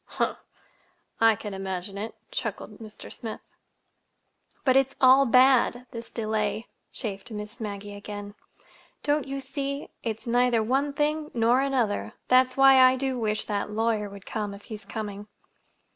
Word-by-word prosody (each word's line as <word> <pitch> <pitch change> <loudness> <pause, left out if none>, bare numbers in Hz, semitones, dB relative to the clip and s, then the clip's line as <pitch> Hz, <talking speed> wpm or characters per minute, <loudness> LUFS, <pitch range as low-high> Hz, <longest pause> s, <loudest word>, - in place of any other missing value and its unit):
"Humph! - - 0 0.8
I 225 -1 +6
can 210 0 -7
imagine 190 0 -4
it," 215 +3 -5 0.2
chuckled 210 -1 -4
Mr. 215 -2 -10
Smith. 225 -2 -6 1.3
"But 260 -2 +4
it's 270 0 +3
all 265 +1 +7
bad—this 250 -2 +3
delay," 215 -1 -2 0.3
chafed 200 -4 -5
Miss 210 +2 -7
Maggie 205 -1 -5
again. 205 0 -7 0.7
"Don't 290 -1 +1
you 275 0 -3
see? 275 +1 -4
It's 225 -2 -4
neither 240 -1 +3
one 270 +5 +1
thing 300 +1 0
nor 235 +3 +4
another. 255 -7 0 0.2
That's 255 0 +4
why 270 -1 +7
I 255 0 +7
do 260 -1 -1
wish 215 -1 0
that 205 -1 -2
lawyer 215 -1 0
would 200 -1 -12
come, 210 -2 -4
if 200 - -14
he's 210 -2 -8
coming." 210 -1 -6
225 Hz, 145 wpm, -27 LUFS, 210-260 Hz, 1.3 s, all